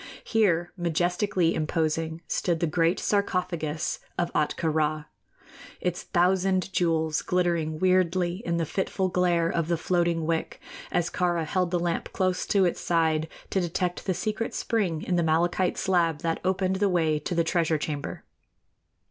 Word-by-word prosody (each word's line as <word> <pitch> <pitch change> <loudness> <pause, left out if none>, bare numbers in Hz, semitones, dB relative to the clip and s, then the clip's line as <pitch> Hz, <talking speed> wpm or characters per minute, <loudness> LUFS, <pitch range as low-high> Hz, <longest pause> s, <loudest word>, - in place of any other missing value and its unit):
Here, 175 -6 +1
majestically 175 +1 +1
imposing, 160 +1 -1
stood 170 -2 0
the 170 - +1
great 165 +2 +1
sarcophagus 180 -6 -1 0.2
of 175 0 -1
Ahtka 155 +1 0
Rā, 155 -1 0 0.7
its 180 0 -2
thousand 185 +1 +1
jewels 160 -3 +1
glittering 170 -3 0
wierdly 185 +1 +2
in 170 0 -1
the 165 - 0
fitful 190 +2 -1
glare 175 -2 +2
of 165 -1 -1
the 170 -1 +1
floating 170 -1 0
wick, 165 0 -2 0.3
as 175 0 0
Kāra 175 -2 0
held 180 +3 0
the 175 - +1
lamp 170 -1 -2
close 185 -2 0
to 195 -2 +3
its 175 - -1
side 160 -2 +1 0.2
to 190 - +1
detect 175 +2 -2
the 185 - +1
secret 215 +3 -2
spring 185 -8 -1
in 180 - 0
the 170 - +2
malachite 175 +3 +1
slab 170 -5 +1
that 165 -2 -1
opened 190 0 +1
the 200 0 +2
way 160 -4 +2
to 175 - -4
the 170 - +3
treasure 165 -1 +1
chamber. 145 -1 -4
175 Hz, 155 wpm, -27 LUFS, 160-185 Hz, 0.7 s, to